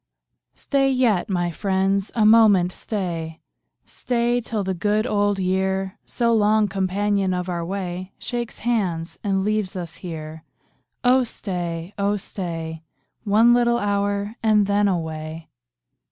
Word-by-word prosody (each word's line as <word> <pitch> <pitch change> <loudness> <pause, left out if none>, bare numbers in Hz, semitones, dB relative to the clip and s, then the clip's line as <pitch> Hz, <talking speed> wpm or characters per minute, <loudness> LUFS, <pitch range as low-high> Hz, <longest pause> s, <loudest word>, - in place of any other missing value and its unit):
Stat 270 -1 +1
yet, 230 -6 +2
my 175 -2 0
friends, 195 +2 0
a 220 -2 +3
moment 210 -5 +6
stay 170 -6 -4 0.2
— - - -57 0.2
Stay 240 0 0
till 220 -3 -3
the 190 0 -1
good 210 +4 0
old 205 -3 +1
year, 190 +1 -1
So 235 -1 +1
long 215 -1 +3
companion 195 0 0
of 180 0 -3
our 170 -1 -2
way, 185 0 -4
Shakes 240 -1 -4
hands, 180 -8 -1
and 195 -1 0
leaves 210 -3 -1
ns 170 -3 -6
here. 160 -2 -7 0.6
Oh 255 +1 +5
stay, 175 -5 -5
oh 200 +1 +1
stay. 165 -5 -5 0.4
One 220 +4 +5
little 235 -1 +3
hour, 205 0 -1
and 215 -2 +4
then 205 +1 +2
away. 160 -2 -4
195 Hz, 135 wpm, -23 LUFS, 180-215 Hz, 0.6 s, moment